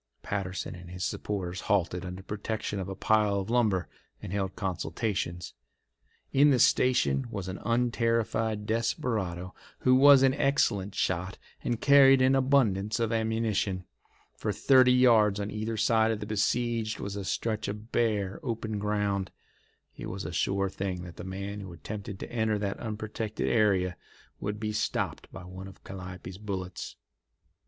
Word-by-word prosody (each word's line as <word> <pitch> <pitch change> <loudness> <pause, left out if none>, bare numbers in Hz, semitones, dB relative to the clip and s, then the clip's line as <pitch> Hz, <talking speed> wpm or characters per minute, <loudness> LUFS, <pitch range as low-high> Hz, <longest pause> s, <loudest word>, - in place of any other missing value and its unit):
Patterson 95 -2 -3
and 90 -1 -11
his 90 +1 -5
supporters 95 -3 -3
halted 90 -3 0
under 90 +1 -7
protection 105 0 -3
of 95 0 -4
a 95 - -4
pile 105 0 +2
of 100 +3 -4
lumber 105 -8 +2 0.3
and 90 - -7
held 95 -2 -2
consultations. 90 -1 -3 0.8
In 145 +2 +6
the 135 - +4
station 120 - +3
was 100 -5 -5
an 95 0 -5
unterrified 115 -2 0
desperado 105 -5 -1 0.3
who 130 - +4
was 135 +1 +8
an 135 -1 +5
excellent 105 -9 +1
shot 90 +2 -1 0.3
and 120 -2 -1
carried 135 -1 +7
an 130 +1 +4
abundance 120 -7 +2
of 115 -1 0
ammunition. 110 -4 0 0.5
For - - -2
thirty 130 -2 +5
yards 115 -5 +5
on 100 +1 -3
either 110 +1 -3
side 110 +1 +3
of 110 -2 -1
the 105 - -5
besieged 110 +1 0
was 100 0 -4
a 100 - -4
stretch 110 +3 -2
of 105 +3 -6
bare, 105 -5 0
open 110 -3 -3
ground. 100 -2 -1 0.7
It - - -7
was 95 0 -5
a 80 - -5
sure 100 +2 +1
thing 95 -2 -4
that 85 -2 -10
the - - -7
man 100 +2 -5
who 95 -3 -8
attempted 100 +3 -7
to - - -7
enter 110 -2 +1
that 100 -1 -3
unprotected 110 -1 -4
area 95 -5 +2 0.4
would 105 +1 -3
be 105 -1 -2
stopped 105 - -2
by - - -9
one 95 +1 -8
of 95 - -14
Calliope's 95 -1 -8
bullets. 95 -3 -5
105 Hz, 155 wpm, -29 LUFS, 95-115 Hz, 0.8 s, was